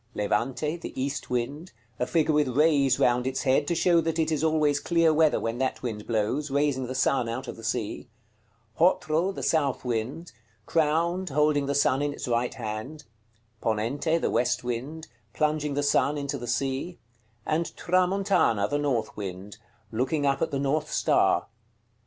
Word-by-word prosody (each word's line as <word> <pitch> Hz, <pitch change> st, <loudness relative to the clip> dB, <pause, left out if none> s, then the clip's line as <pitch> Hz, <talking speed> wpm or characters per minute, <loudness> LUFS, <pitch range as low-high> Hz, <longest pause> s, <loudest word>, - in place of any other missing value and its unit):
Levante, 130 Hz, +9 st, -1 dB
the 165 Hz, -, -8 dB
east 140 Hz, +1 st, -3 dB
wind; 140 Hz, +8 st, -3 dB, 0.3 s
a 125 Hz, -, 0 dB
figure 160 Hz, -2 st, +2 dB
with 150 Hz, -1 st, +3 dB
rays 145 Hz, -4 st, +4 dB
round 125 Hz, +1 st, +2 dB
its 130 Hz, 0 st, -2 dB
head, 135 Hz, +2 st, +2 dB
to 170 Hz, -, 0 dB
show 170 Hz, 0 st, +3 dB
that 165 Hz, 0 st, -2 dB
it 160 Hz, -1 st, +1 dB
is 155 Hz, 0 st, 0 dB
always 155 Hz, -2 st, +2 dB
clear 165 Hz, -1 st, +3 dB
weather 155 Hz, -1 st, +3 dB
when 115 Hz, +2 st, -3 dB
that 130 Hz, -1 st, -2 dB
wind 110 Hz, -4 st, -5 dB
blows, 115 Hz, +6 st, -1 dB
raising 140 Hz, -2 st, 0 dB
the 130 Hz, -, -5 dB
sun 130 Hz, -2 st, +1 dB
out 120 Hz, +3 st, -4 dB
of -, -, -6 dB
the 115 Hz, -, -13 dB
sea: 110 Hz, +1 st, -3 dB, 0.7 s
Hotro, 170 Hz, +1 st, +2 dB
the -, -, -7 dB
south 140 Hz, -6 st, 0 dB
wind; 125 Hz, +8 st, -3 dB, 0.3 s
crowned, 165 Hz, +4 st, +1 dB
holding 150 Hz, 0 st, +2 dB
the 140 Hz, -, -1 dB
sun 135 Hz, -1 st, +2 dB
in 145 Hz, 0 st, -1 dB
its -, -, -6 dB
right 120 Hz, 0 st, 0 dB
hand; 115 Hz, +7 st, -6 dB, 0.6 s
Ponente, 135 Hz, +10 st, 0 dB
the -, -, -1 dB
west 125 Hz, +1 st, +1 dB
wind; 135 Hz, +7 st, -5 dB, 0.3 s
plunging 150 Hz, -1 st, 0 dB
the 145 Hz, -, 0 dB
sun 145 Hz, +1 st, +2 dB
into 140 Hz, -1 st, -3 dB
the 120 Hz, -, -7 dB
sea: 135 Hz, +8 st, -2 dB, 0.5 s
and 165 Hz, +2 st, -1 dB
Tramontana, 185 Hz, -, +2 dB
the 145 Hz, -, -1 dB
north 125 Hz, -7 st, -1 dB
wind; 100 Hz, +1 st, -7 dB, 0.3 s
looking 135 Hz, +6 st, 0 dB
up 140 Hz, -1 st, +1 dB
at 165 Hz, -, +1 dB
the 140 Hz, -, -2 dB
north 145 Hz, +3 st, -1 dB
star. -, -, +2 dB
140 Hz, 170 wpm, -27 LUFS, 125-155 Hz, 0.7 s, rays